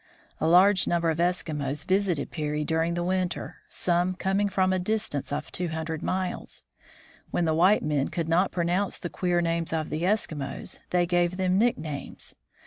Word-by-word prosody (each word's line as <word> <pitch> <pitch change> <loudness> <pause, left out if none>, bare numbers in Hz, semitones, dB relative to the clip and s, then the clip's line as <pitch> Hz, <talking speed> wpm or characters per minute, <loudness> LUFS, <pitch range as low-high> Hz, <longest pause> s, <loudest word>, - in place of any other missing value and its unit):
A - - +1
large 185 +3 +6
number 170 -1 +2
of 160 - -4
Eskimos 150 -5 0
visited 185 -6 +1
Peary 150 -1 -2
during 160 +2 0
the 175 - -1
winter, 185 0 -2
some 180 +1 +1
coming 195 +2 +1
from 190 -1 +2
a 185 - +1
distance 185 -8 -2
of 150 +1 -3
two 180 - -1
hundred 160 -1 -4
miles. 185 -1 -2 0.7
When 175 - 0
the 160 - +2
white 180 +6 +4
men 145 -2 +1
could 165 -2 -3
not 175 +4 +2
pronounce 180 +3 0
the 175 - -6
queer 175 -1 +1
names 165 -1 -1
of 160 -1 -2
the 155 +1 -2
Eskimos, 165 -8 -2
they 180 -1 +2
gave 175 +1 +1
them 185 0 +2
nicknames. 160 -11 -2
175 Hz, 170 wpm, -27 LUFS, 160-185 Hz, 0.7 s, large